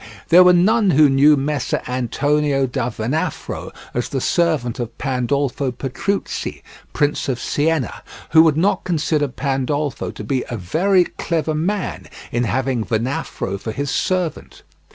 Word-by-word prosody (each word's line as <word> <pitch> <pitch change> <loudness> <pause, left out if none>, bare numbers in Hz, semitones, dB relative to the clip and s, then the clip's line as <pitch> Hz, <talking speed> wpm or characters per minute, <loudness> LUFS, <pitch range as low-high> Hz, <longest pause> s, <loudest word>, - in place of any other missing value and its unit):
There 180 +2 +8
were 180 - +7
none 205 +4 +4
who 150 -3 +5
knew 145 +2 +5
Messer 140 -1 -1
Antonio 135 +3 +1
da 125 -1 -2
Venafro 125 +7 -3 0.2
as 120 - -2
the 135 - -2
servant 150 -6 0
of 120 -1 -5
Pandolfo 135 +1 -1
Petrucci, 140 +11 -3 0.3
Prince 145 -1 0
of 125 -2 -1
Siena, 155 -2 -1 0.3
who 160 - +8
would 160 -2 +4
not 190 +3 +1
consider 155 -3 0
Pandolfo 140 +2 -2
to - - -8
be 130 -3 -1
a 120 - -3
very 180 - +2
clever 160 -2 -2
man 185 +6 -2 0.2
in 120 +1 0
having 130 0 0
Venafro 110 -4 -2
for 110 +3 -5
his 140 +5 -3
servant. 180 -2 -2
145 Hz, 140 wpm, -20 LUFS, 125-160 Hz, 0.3 s, There